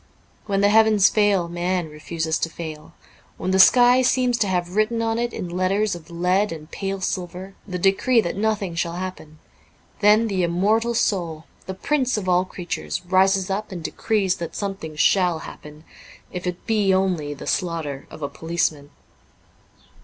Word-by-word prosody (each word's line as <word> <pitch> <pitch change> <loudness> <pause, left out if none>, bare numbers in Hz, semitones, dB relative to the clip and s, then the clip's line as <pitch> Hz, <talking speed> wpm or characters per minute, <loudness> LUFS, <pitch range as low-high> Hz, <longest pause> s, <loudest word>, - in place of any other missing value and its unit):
When 200 -1 +1
the 205 - +4
heavens 215 -2 +5
fail 205 -5 +2
man 175 0 -2
refuses 160 +1 -3
to 165 - -1
fail; 155 -2 -8 0.4
when 185 - -2
the 190 - +2
sky 245 +5 +7
seems 250 -1 +2
to 205 - +2
have 180 -1 -2
written 215 +2 +1
on 225 0 0
it, 240 0 -1
in 180 - -5
letters 190 +4 0
of 170 -1 -9
lead 180 +4 +1
and 155 -1 -9
pale 195 -1 -4
silver, 185 +1 -4
the 185 -2 -4
decree 195 +7 +3
that 175 -6 -1
nothing 205 -3 -1
shall 170 0 -2
happen, 180 -4 -7 0.6
then 215 +2 +5
the 195 -3 -1
immortal 210 +7 +1
soul, 170 -8 -1 0.2
the 190 - -5
prince 260 +2 0
of 195 -3 -4
all 180 0 +3
creatures, 165 - -5
rises 190 +1 +2
up 210 +2 -3
and 175 -3 -6
decrees 195 +2 0
that 170 - -6
something 195 -6 -5
shall 180 +2 +3
happen, 150 +1 -11 0.5
if 180 0 -5
it 180 -1 -5
be 210 -4 +2
only 180 -6 0
the - - -9
slaughter 160 -6 -2
of 155 - -10
a - - 0
policeman. 155 -1 -2
185 Hz, 170 wpm, -22 LUFS, 170-205 Hz, 0.6 s, sky